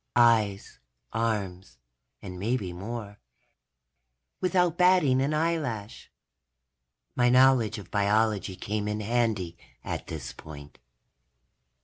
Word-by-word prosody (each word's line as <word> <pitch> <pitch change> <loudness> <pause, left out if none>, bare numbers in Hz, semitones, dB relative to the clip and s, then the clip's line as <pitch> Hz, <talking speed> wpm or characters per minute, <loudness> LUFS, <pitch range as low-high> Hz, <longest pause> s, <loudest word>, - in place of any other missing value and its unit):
Eyes, 110 -4 +3 0.3
arms 95 - -2 0.5
and 90 -2 -7
maybe 100 -3 -2
more. 105 +2 -7 1.2
Without 180 -2 +2
batting 180 -8 +4
an 140 +2 0
eyelash. 150 -9 -2 1.0
My 120 -1 +3
knowledge 125 -3 +4
of 100 -4 -11
biology 105 -1 +1
came 105 +2 -3
in 105 0 -2
handy, 105 -6 -1 0.3
at - - -5
this 80 -7 -6
point. 75 -2 -12
110 Hz, 95 wpm, -27 LUFS, 100-125 Hz, 1.2 s, batting